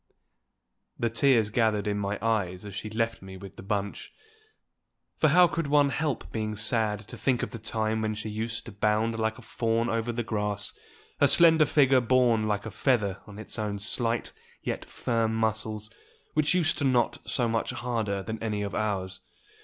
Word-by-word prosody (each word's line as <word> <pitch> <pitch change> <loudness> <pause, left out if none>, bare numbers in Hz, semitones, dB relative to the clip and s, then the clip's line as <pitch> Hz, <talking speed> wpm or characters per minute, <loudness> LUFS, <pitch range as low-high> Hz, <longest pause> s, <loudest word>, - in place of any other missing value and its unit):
The 115 -1 0
tears 115 -3 +3
gathered 110 -3 +1
in 105 -1 -1
my 100 0 -2
eyes 100 -4 0
as 100 - -8
she 105 +3 -5
left 115 +1 -1
me 95 0 -9
with 100 0 -11
the - - -10
bunch; 100 0 -3 1.0
for 155 - +3
how 175 +4 +6
could 165 -2 -2
one 145 0 +4
help 145 0 -2
being 110 -1 -3
sad 105 -1 0
to 125 - -9
think 120 +2 0
of - - -4
the 115 - -7
time 110 0 -1
when 110 0 -1
she 105 +1 -5
used 110 +2 -4
to 115 - -8
bound 105 +2 0
like 110 0 0
a - - -13
fawn 115 0 0
over 115 +1 -1
the 120 0 -2
grass, 105 -2 -2 0.5
her - - +6
slender 160 -3 +6
figure 135 -3 +4
borne 120 -3 +3
like 105 0 -1
a 110 - -5
feather 105 -5 +1
on 100 -1 -11
its 110 +1 -5
own 105 -1 -2
slight 115 +3 -1 0.3
yet - - -3
firm 115 -2 -1
muscles, 110 -1 -1 0.4
which 155 +3 +3
used 175 -3 +2
to - - -1
knot 125 -4 +2
so 120 -3 0
much 115 0 -1
harder 110 -4 -2
than 110 +1 -5
any 105 -2 -2
of 100 - -4
ours. 95 -3 -2
110 Hz, 185 wpm, -27 LUFS, 105-120 Hz, 1.0 s, how